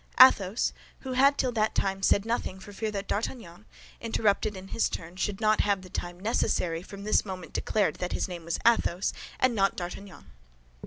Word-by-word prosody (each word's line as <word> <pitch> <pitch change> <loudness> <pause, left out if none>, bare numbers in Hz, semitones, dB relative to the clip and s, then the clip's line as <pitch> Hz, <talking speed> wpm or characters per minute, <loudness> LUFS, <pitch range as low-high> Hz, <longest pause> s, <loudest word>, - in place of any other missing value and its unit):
Athos, 220 -4 +6 0.3
who 265 - -6
had 275 +2 +4
till 255 - +1
that 220 -2 0
time 195 0 0
said 200 +1 +3
nothing 225 -5 -2
for 205 +2 -11
fear 220 +2 -2
that 200 -1 -4
D'Artagnan, 210 -3 -4 0.3
interrupted 215 -2 0
in 190 +1 -10
his 230 - +1
turn, 170 +1 -7
should 195 +1 -2
not 215 0 +3
have 200 -2 0
the 185 - -13
time 175 0 -5
necessary, 180 -5 0
from 200 +2 -10
this 215 - +2
moment 185 -4 -7
declared 210 -3 0
that 180 - -3
his - - -1
name 175 -3 -7
was 170 +1 -2
Athos, 205 -5 +2 0.3
and 255 -1 +3
not 195 -3 +2
D'Artagnan. 180 - -8
200 Hz, 190 wpm, -28 LUFS, 185-220 Hz, 0.3 s, Athos